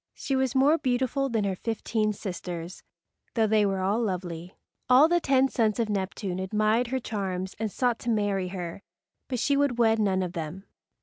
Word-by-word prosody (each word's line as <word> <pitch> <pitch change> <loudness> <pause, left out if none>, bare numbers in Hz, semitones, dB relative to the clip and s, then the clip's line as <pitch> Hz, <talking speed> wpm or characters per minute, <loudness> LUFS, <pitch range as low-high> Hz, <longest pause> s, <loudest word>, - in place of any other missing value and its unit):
She 270 - -2
was 265 -1 0
more 290 +5 +4
beautiful 260 +2 0
than 225 -3 0
her 195 -1 -1
fifteen 220 +1 -1
sisters, 180 -3 -6 0.5
though 225 -2 +3
they 215 -1 +3
were 195 -1 -1
all 200 +5 +1
lovely. 180 -4 -4 0.3
All 260 +5 +7
the 345 +1 +3
ten 270 -4 +3
sons 225 -4 0
of 225 -2 0
Neptune 190 -2 -2
admired 215 +5 +1
her 260 +2 -1
charms 190 -5 -4
and 220 -2 -2
sought 245 0 0
to 240 - -4
marry 205 -4 +1
her, 180 0 -6 0.5
but 255 - -2
she 280 +4 +2
would 280 -4 +1
wed 225 -2 +3
none 190 -3 +1
of 180 -1 -4
them. 165 +2 -5
215 Hz, 185 wpm, -27 LUFS, 190-245 Hz, 0.5 s, All